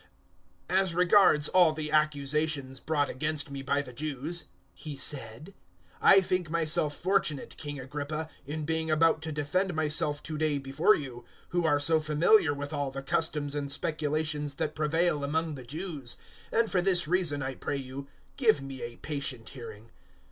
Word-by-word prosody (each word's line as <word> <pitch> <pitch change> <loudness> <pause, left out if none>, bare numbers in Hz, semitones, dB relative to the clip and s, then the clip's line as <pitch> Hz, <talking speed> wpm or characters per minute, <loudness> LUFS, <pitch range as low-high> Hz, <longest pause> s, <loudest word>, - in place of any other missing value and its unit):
026:002 185 - +2
"As 185 -3 -1
regards 180 -4 +5
all 175 -4 +5
the 155 -1 -5
accusations 150 -2 0
brought 145 -2 0
against 150 +1 -2
me 140 -1 -5
by 140 +1 0
the 125 -2 -11
Jews," 155 +5 -3 0.3
he 150 -3 -8
said, 135 - 0 0.5
"I 195 - +7
think 180 -2 -1
myself 160 -2 +1
fortunate, 175 -6 0
King 145 -2 -5
Agrippa, 145 +4 -4 0.2
in 150 +1 -4
being 160 0 -1
about 155 0 +3
to 160 0 -4
defend 170 +5 -1
myself 150 -1 0
to 155 -1 -5
day 155 -2 +1
before 140 +9 +3
you, 135 -5 -6
026:003 120 - -21 0.2
who 175 -1 0
are 145 -2 +3
so 160 +2 +4
familiar 155 +3 +4
with 145 +1 -5
all 145 -2 -1
the 135 0 -7
customs 145 0 0
and 145 -1 -2
speculations 150 -1 -2
that 150 +2 -2
prevail 155 0 0
among 160 +2 -1
the 130 -3 -8
Jews; 150 -1 -5 0.3
and 230 -1 +2
for 180 - +2
this 175 -3 +3
reason, 165 -5 +1
I 130 0 -3
pray 140 - -3
you, 135 +1 -7 0.3
give 230 - +4
me 135 -1 -8
a 120 0 -6
patient 135 -6 -3
hearing. 115 -3 -10
150 Hz, 170 wpm, -29 LUFS, 140-160 Hz, 0.5 s, I